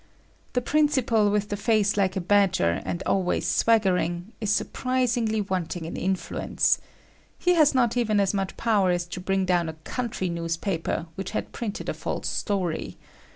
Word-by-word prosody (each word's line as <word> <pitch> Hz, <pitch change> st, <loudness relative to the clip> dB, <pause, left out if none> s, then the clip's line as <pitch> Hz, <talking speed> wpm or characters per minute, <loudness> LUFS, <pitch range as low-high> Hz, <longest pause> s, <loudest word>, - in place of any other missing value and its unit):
The 250 Hz, -, +1 dB
principal, 260 Hz, -8 st, +2 dB
with 205 Hz, 0 st, 0 dB
the 205 Hz, -, -1 dB
face 210 Hz, 0 st, +2 dB
like 195 Hz, -2 st, +1 dB
a 190 Hz, -, -1 dB
badger 185 Hz, -, +2 dB
and 175 Hz, -, -3 dB
always 185 Hz, -2 st, +1 dB
swaggering, 185 Hz, -4 st, +1 dB
is 215 Hz, -, -1 dB
surprisingly, 235 Hz, -1 st, 0 dB
wanting 180 Hz, -3 st, -3 dB
in 165 Hz, -, -6 dB
influence. 190 Hz, +1 st, 0 dB, 0.6 s
He 360 Hz, -, +2 dB
has 305 Hz, -5 st, +4 dB
not 240 Hz, -3 st, +3 dB
even 220 Hz, -4 st, +2 dB
as 200 Hz, 0 st, +2 dB
much 195 Hz, -1 st, -2 dB
power 210 Hz, -5 st, +2 dB
as 175 Hz, -1 st, 0 dB
to 175 Hz, -, -7 dB
bring 190 Hz, +1 st, 0 dB
down 175 Hz, -3 st, +1 dB
a -, -, -5 dB
country 235 Hz, -6 st, -3 dB
newspaper, 165 Hz, 0 st, -2 dB
which 190 Hz, +2 st, -5 dB
had -, -, -4 dB
printed 215 Hz, -4 st, -5 dB
a -, -, -1 dB
false -, -, -4 dB
story. 185 Hz, -6 st, -2 dB
200 Hz, 160 wpm, -26 LUFS, 180-225 Hz, 0.6 s, has